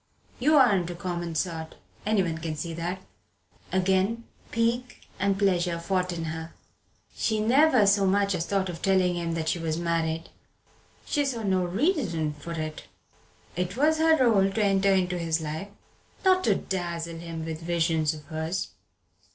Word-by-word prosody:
You 300 +5 +4
aren't 200 -10 +4
a 175 - -5
common 175 -2 -4
sort 160 -2 -3 0.3
anyone 185 -7 +1
can 160 -1 -4
see 165 +2 -4
that." 175 +3 -4 0.7
Again 190 +5 +1 0.3
pique 235 +2 -1
and 195 0 +1
pleasure 180 -4 +1
fought 180 +1 -1
in 170 -1 -4
her. 160 +1 -6 0.6
She 220 -1 0
never 250 +1 +5
so 200 0 +4
much 200 +1 +2
as 165 -2 -2
thought 195 -1 0
of 170 -2 -6
telling 185 -2 +2
him 170 -1 -2
that 160 -1 -3
she 175 - 0
was 160 -1 -2
married. 165 -1 -1 0.8
She 290 - +1
saw 250 -5 -2
no 190 -2 +2
reason 180 - 0
for 150 +3 -8
it. 155 -1 -5 0.7
It 180 +4 -2
was 310 +3 +3
her 320 0 +5
rôle 210 -7 +4
to 220 - +2
enter 195 0 +3
into 180 -2 +1
his 165 -1 0
life, 160 +4 -4 0.6
not 370 0 +5
to - - +4
dazzle 170 -3 -4
him 165 -1 -6
with 160 0 -5
visions 165 -2 +1
of 150 - -11
hers. 160 +4 -3
180 Hz, 160 wpm, -27 LUFS, 165-200 Hz, 0.8 s, never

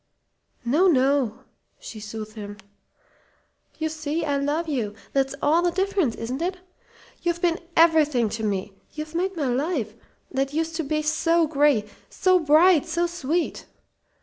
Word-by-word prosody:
"No 305 +11 +3
no," 265 - +2 0.4
she 220 - -9
soothed 215 0 -7
him. 205 -2 -8 1.2
"You 315 - -1
see, 315 +1 -3
I 285 -2 0
love 295 +4 -1
you. 230 -9 -2 0.2
That's 270 0 +1
all 315 +4 +4
the 350 - +2
difference, 375 - 0
isn't 250 +6 -4
it? 365 +2 -1 0.6
You've 345 -1 -1
been 345 0 +1 0.2
everything 305 -7 +4
to 225 +1 -5
me. 200 -1 -2 0.2
You've 310 0 -6
made 365 +2 -1
my 295 - -1
life 255 - -1 0.4
that 270 +1 -1
used 325 0 -1
to 325 - -1
be 305 +1 -1
so 330 +2 +2
gray 290 -8 +2 0.2
so 370 -1 +3
bright, 320 +1 +5
so 340 +1 0
sweet. 340 -1 -2
300 Hz, 150 wpm, -24 LUFS, 255-335 Hz, 1.2 s, bright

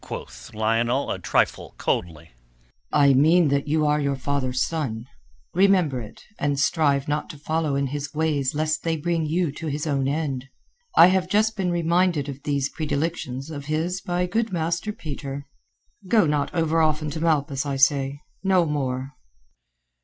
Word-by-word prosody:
quoth 60 0 -8
Lionel 115 +5 +1
a - - -3
trifle - - 0
coldly. 85 -1 -2 0.6
"I 140 -1 +5
mean 160 +4 +5
that 140 +1 0
you 155 +1 +2
are 150 0 +2
your 140 -1 0
father's 130 -1 -1
son. 130 -9 -3 0.5
Remember 180 -8 +3
it, 105 - -11 0.2
and 145 -1 0
strive 140 -2 +2
not 150 0 -2
to 150 - -9
follow 155 0 -1
in 140 0 +1
his 145 +1 -4
ways 150 -3 0
lest 155 0 0
they 165 -1 -1
bring 165 0 -1
you 165 0 0
to 160 +3 -7
his 150 +1 -2
own 140 -3 0
end. 140 -3 -2 0.5
I - - +10
have 185 -1 0
just 215 +2 +2
been 190 -3 -1
reminded 170 -2 +1
of 140 -1 -7
these 140 -2 0
predilections 145 -3 -3
of 145 -2 -6
his 165 +5 -1
by 180 0 0
good 220 +5 -1
Master 175 +4 -1
Peter. 140 -7 -6 0.6
Go 215 -1 +4
not 150 -1 0
over 165 -1 +1
often 155 -1 +1
to 160 +1 -5
Malpas, 145 -5 +1
I 140 - -1
say. 140 +1 +2 0.2
No 190 -3 +3
more." 135 -3 -2
150 Hz, 165 wpm, -24 LUFS, 140-165 Hz, 0.6 s, I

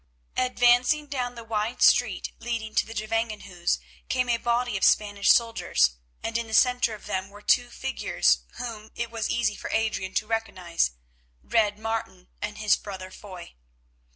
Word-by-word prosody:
Advancing 250 +3 +3
down 250 -4 -3
the 235 - -8
wide 220 +1 -1
street - - +4
leading 230 -2 -4
to - - +2
the 225 - -9
Gevangenhuis 215 -5 -1 0.3
came 250 -1 +1
a 235 - +3
body 240 0 0
of 190 - -2
Spanish 205 -1 +3
soldiers, 230 - +4 0.3
and 230 +1 -1
in 235 - -4
the 220 - -1
centre 245 -2 +4
of 210 - -14
them 190 +1 -3
were 205 +1 -14
two 245 -1 +3
figures 265 +2 +1
whom 225 -3 -7
it 235 -1 -3
was 230 -1 -2
easy 235 -3 +1
for - - -7
Adrian 215 -4 -1
to - - +1
recognise—Red 170 - -2
Martin 220 -4 -4
and 210 0 -4
his 215 -1 +4
brother 190 -2 -8
Foy. 185 -4 -10
220 Hz, 155 wpm, -26 LUFS, 200-235 Hz, 0.3 s, street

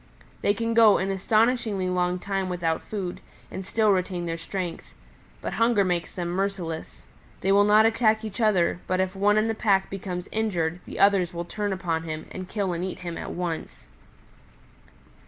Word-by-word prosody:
They 205 - +2
can 230 +2 -1
go 225 -3 +7
an 195 +1 -1
astonishingly 215 0 +1
long 180 0 0
time 195 0 -2
without 170 -3 -1
food 190 -4 -5 0.3
and 190 - -5
still 215 +2 +2
retain 180 -2 0
their 165 -1 -2
strength. 170 0 -5 0.5
But - - -3
hunger 230 -3 +3
makes 175 -2 -2
them 175 -2 -3
merciless. 180 -3 -3 0.4
They 195 - +2
will 200 +1 +6
not 210 +1 +6
attack 225 -1 +2
each 215 +2 -5
other, 190 -5 +2
but 185 0 0
if 190 0 0
one 205 +2 +3
in 215 +1 +3
the 225 - 0
pack 195 -3 +1
becomes 185 -2 -5
injured, 175 -6 -1
the - - -7
others 195 -3 +3
will 170 0 -3
turn 205 +3 -3
upon 175 -4 -1
him, 155 -1 -5
and 185 -1 -7
kill 200 -4 -1
and 170 +1 -3
eat 185 0 -5
him 170 -2 -5
at - - -6
once. 175 -2 -5
190 Hz, 180 wpm, -26 LUFS, 175-210 Hz, 0.5 s, go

